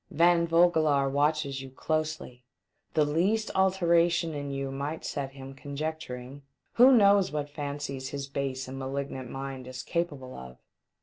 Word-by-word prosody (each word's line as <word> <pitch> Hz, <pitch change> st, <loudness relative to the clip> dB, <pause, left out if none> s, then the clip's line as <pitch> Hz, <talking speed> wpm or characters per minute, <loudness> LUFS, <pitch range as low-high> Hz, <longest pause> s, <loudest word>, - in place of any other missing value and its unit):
"Van 170 Hz, +1 st, +4 dB
Vogelaar 160 Hz, -5 st, +4 dB
watches 145 Hz, 0 st, 0 dB
you 135 Hz, -, -8 dB
closely; 155 Hz, -2 st, -3 dB, 0.5 s
the 155 Hz, -, +4 dB
least 190 Hz, +9 st, +1 dB
alteration 170 Hz, -3 st, +3 dB
in 145 Hz, -1 st, -4 dB
you 135 Hz, -1 st, -3 dB
might 140 Hz, +4 st, -4 dB
set 135 Hz, -2 st, -4 dB
him 135 Hz, 0 st, -9 dB
conjecturing. 140 Hz, -2 st, -6 dB, 0.3 s
Who 250 Hz, +3 st, +7 dB
knows 200 Hz, -5 st, +5 dB
what 145 Hz, -1 st, -3 dB
fancies 140 Hz, -2 st, -4 dB
his 140 Hz, -1 st, -4 dB
base 135 Hz, -1 st, -3 dB
and 135 Hz, +1 st, -6 dB
malignant 135 Hz, -1 st, -4 dB
mind 135 Hz, -1 st, -6 dB
is 130 Hz, 0 st, -7 dB
capable 145 Hz, -7 st, -3 dB
of? 65 Hz, 0 st, -10 dB
145 Hz, 140 wpm, -28 LUFS, 135-165 Hz, 0.5 s, Who